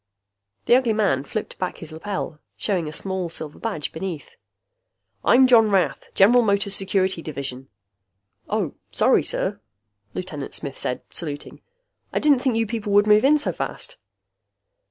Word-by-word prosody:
The 240 - +6
ugly 250 -3 +3
man 195 -11 +1
flipped 210 +9 -5
back 185 - -3
his 165 -2 -9
lapel, 165 -1 -5 0.2
showing 180 -6 -1
a - - -4
small 190 +2 -2
silver 155 -2 -6
badge 200 -10 -3
beneath. 165 -3 -6 0.9
"I'm 260 +2 +6
John 230 -4 +6
Rath, 195 -3 +1
General 235 +6 +6
Motors 200 -2 +2
Security 190 -3 +1
Division." 135 -4 -5 0.8
"Oh... - - -1 0.2
Sorry, - - +3
sir," - - -2 0.6
Lieutenant 155 -6 -5
Smith 140 -3 -5
said, 125 - -2
saluting. 145 -4 -6 0.5
"I - - -2
didn't 290 -4 +4
think 255 -2 0
you 225 0 +2
people 215 -2 -4
would 205 +1 +6
move 210 0 +5
in 295 +3 +5
so 295 - -1
fast." - - -5
195 Hz, 150 wpm, -23 LUFS, 155-220 Hz, 0.9 s, The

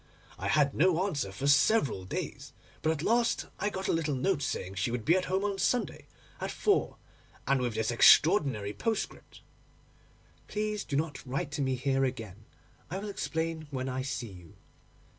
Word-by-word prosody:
I - - -3
had 145 -3 +3
no 180 +2 +3
answer 145 - -2
for 135 +8 -5
several 140 - +3
days, 90 - -5 0.3
but 160 - +2
at 155 -1 -3
last 235 +3 +2
I 205 - 0
got 190 -1 -4
a - - +2
little 160 -3 0
note 145 +4 0
saying 95 -8 -3
she 100 +5 -1
would 120 -2 -3
be 170 - +5
at 185 -1 +1
home 190 +2 0
on 200 -1 -2
Sunday 245 +6 0 0.3
at - - -3
four 410 -1 +1 0.5
and 135 -1 +2
with 120 -3 -1
this 110 +1 0
extraordinary 120 - +5
postscript: 225 - -4 1.0
"Please 210 -1 -2
do 140 - -4
not 150 0 -2
write 135 +2 -3
to 150 0 -3
me 130 -1 +1
here 135 +1 +1
again; 110 -5 -4 0.4
I 180 - -3
will 205 +2 -5
explain 160 -4 -3
when 130 -2 -3
I 130 0 -2
see 130 -4 -4
you." 90 -3 -14
145 Hz, 180 wpm, -30 LUFS, 125-185 Hz, 1.0 s, be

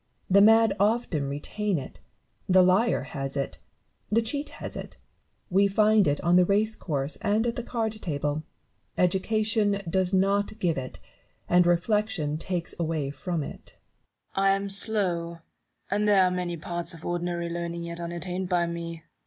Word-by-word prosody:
The 200 +1 +6
mad 225 0 +6
often 200 - +1
retain 195 +7 -2
it; 130 - -8 0.5
the 185 0 +6
liar 190 +6 +3
has 135 -2 -4
it, 140 - -3 0.5
the 225 +2 +2
cheat 285 +6 -1
has - - -5
it; - - -8 0.5
we 195 +2 +4
find 210 0 +4
it 145 0 +1
on 175 +2 +4
the 180 - +6
race 210 +3 +2
course 140 -3 -2
and 215 +2 +1
at 235 - -1
the - - -3
card 230 -2 -2
table: 145 -1 -2 0.6
education 205 +2 +1
does 185 +1 +1
not 200 +2 +1
give 175 -6 0
it, 130 -1 -6 0.5
and 180 0 +4
reflection 175 -4 +1
takes 175 -1 -2
away 155 -4 -1
from 170 +1 -3
it. - - -10 0.6
Newton. 195 - +1
I 195 - +5
am 200 0 -3
slow; 180 -5 0 0.5
and 210 +1 +1
there 200 -2 +5
are 180 - +2
many 180 -1 -2
parts 170 +1 -5
of 165 - -12
ordinary 175 0 -2
learning 170 0 -4
yet 170 0 -6
unattained 175 +2 -4
by 175 -2 +2
me. 170 -1 -6
180 Hz, 160 wpm, -27 LUFS, 170-205 Hz, 0.6 s, The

